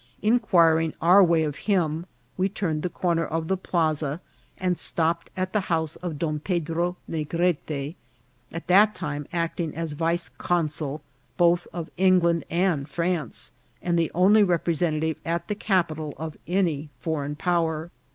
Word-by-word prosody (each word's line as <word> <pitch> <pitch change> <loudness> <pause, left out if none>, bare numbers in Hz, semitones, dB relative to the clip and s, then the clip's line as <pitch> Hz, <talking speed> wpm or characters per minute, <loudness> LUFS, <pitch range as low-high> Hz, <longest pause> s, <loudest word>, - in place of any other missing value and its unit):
Inquiring 170 -8 +3
our 180 +4 +7
way 165 -2 +3
of 150 -2 -2
him, 170 -3 +1 0.3
we 185 +1 +1
turned 170 -7 -2
the 180 - -1
corner 170 -1 0
of 160 0 -2
the 190 - +1
plaza, 155 -5 -1 0.4
and 180 -1 0
stopped 170 0 0
at 185 0 -2
the 210 - +3
house 160 -2 0
of 175 -4 -5
Don 155 -1 -1
Pedro 170 +1 -1
Negrete, 155 -2 -1 0.6
at 165 - -6
that 205 +4 +5
time 145 -4 -4
acting 170 -2 -2
as 165 -1 -3
vice 165 +3 0
consul 155 -4 -2 0.3
both 175 -1 +3
of 170 -2 -6
England 180 -2 +3
and 170 -5 0
France, 170 -4 -2 0.3
and 170 -1 0
the 165 - +1
only 195 +5 +6
representative 165 -3 0
at 170 +1 -2
the 210 - -1
capital 170 -8 -1
of 155 -1 -5
any 165 -5 0
foreign 150 -3 -2
power. 165 -1 0
170 Hz, 145 wpm, -25 LUFS, 155-180 Hz, 0.6 s, our